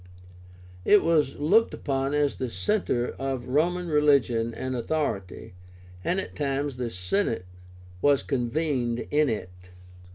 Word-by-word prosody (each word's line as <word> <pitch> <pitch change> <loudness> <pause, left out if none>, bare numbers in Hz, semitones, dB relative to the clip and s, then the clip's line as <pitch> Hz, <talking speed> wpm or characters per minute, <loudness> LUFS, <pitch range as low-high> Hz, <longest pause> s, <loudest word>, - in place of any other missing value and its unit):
It 210 - +5
was 155 -5 +2
looked 200 +11 +3
upon 135 0 -1
as 145 -1 +1
the 130 - -3
centre 155 - 0
of 135 -2 -3
Roman 175 +6 +1
religion 140 -7 +3
and 130 +3 -4
authority, 115 - -3 0.5
and 180 - 0
at - - -6
times 140 -2 -2
the 125 -2 -2
Senate 90 - -1 0.6
was 145 -1 +3
convened 125 -2 -1
in 150 -1 +3
it. 105 -5 -3
135 Hz, 125 wpm, -26 LUFS, 120-155 Hz, 0.6 s, It